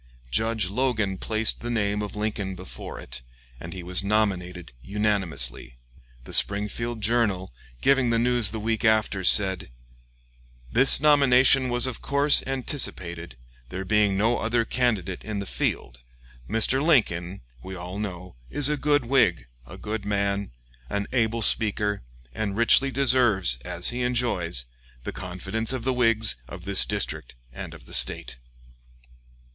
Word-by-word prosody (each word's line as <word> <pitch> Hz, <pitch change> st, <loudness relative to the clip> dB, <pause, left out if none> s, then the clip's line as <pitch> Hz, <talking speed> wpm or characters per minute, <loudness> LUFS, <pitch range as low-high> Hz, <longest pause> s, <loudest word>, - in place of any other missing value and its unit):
Judge 110 Hz, -, 0 dB
Logan 110 Hz, -5 st, -1 dB
placed 110 Hz, 0 st, 0 dB
the 120 Hz, -, -5 dB
name 105 Hz, -3 st, -1 dB
of 105 Hz, -1 st, -6 dB
Lincoln 105 Hz, -2 st, -3 dB
before 95 Hz, +1 st, -9 dB
it, -, -, -6 dB, 0.4 s
and 85 Hz, -, -9 dB
he 90 Hz, 0 st, -8 dB
was 90 Hz, +2 st, 0 dB
nominated 95 Hz, -5 st, -2 dB
unanimously. 85 Hz, -, -2 dB, 0.5 s
The -, -, -10 dB
Springfield 110 Hz, +3 st, -1 dB
"Journal," 100 Hz, -, 0 dB, 0.3 s
giving 135 Hz, -3 st, +2 dB
the 115 Hz, -, +1 dB
news 120 Hz, -2 st, +1 dB
the 110 Hz, -, -6 dB
week 110 Hz, +1 st, -2 dB
after, 110 Hz, -3 st, +1 dB
said: 95 Hz, -2 st, +4 dB, 1.0 s
"This 135 Hz, +3 st, +6 dB
nomination 135 Hz, -3 st, +4 dB
was 120 Hz, 0 st, +1 dB
of 130 Hz, -3 st, -5 dB
course 140 Hz, +1 st, +5 dB
anticipated, 95 Hz, -, -1 dB, 0.3 s
there 95 Hz, +1 st, -6 dB
being 105 Hz, 0 st, +1 dB
no 115 Hz, +4 st, +1 dB
other 115 Hz, +1 st, 0 dB
candidate 110 Hz, -8 st, -2 dB
in 110 Hz, -1 st, -5 dB
the 100 Hz, -, -4 dB
field. -, -, -4 dB, 0.5 s
Mr. 115 Hz, +5 st, +2 dB
Lincoln, 100 Hz, -, +1 dB, 0.2 s
we 95 Hz, +7 st, -8 dB
all 90 Hz, +2 st, -7 dB
know, 90 Hz, -5 st, -7 dB
is 145 Hz, -, +2 dB
a 150 Hz, -, -1 dB
good 145 Hz, -2 st, +1 dB
Whig, 110 Hz, -, +2 dB, 0.2 s
a -, -, -11 dB
good 105 Hz, 0 st, -5 dB
man, 100 Hz, -1 st, -2 dB, 0.4 s
an 100 Hz, 0 st, -2 dB
able 115 Hz, -2 st, 0 dB
speaker, 105 Hz, -1 st, +2 dB, 0.3 s
and 100 Hz, +2 st, -4 dB
richly 115 Hz, +4 st, +4 dB
deserves, 120 Hz, -, +3 dB
as -, -, +2 dB
he 125 Hz, +1 st, -4 dB
enjoys, 115 Hz, -, -1 dB, 0.4 s
the -, -, -5 dB
confidence 95 Hz, +6 st, -4 dB
of 130 Hz, -3 st, -4 dB
the 130 Hz, +1 st, 0 dB
Whigs 115 Hz, -3 st, +2 dB
of 85 Hz, +6 st, -11 dB
this 100 Hz, -1 st, +2 dB
district -, -, -4 dB, 0.2 s
and -, -, -8 dB
of -, -, -15 dB
the -, -, -14 dB
State." -, -, -1 dB
105 Hz, 145 wpm, -24 LUFS, 95-120 Hz, 1.0 s, This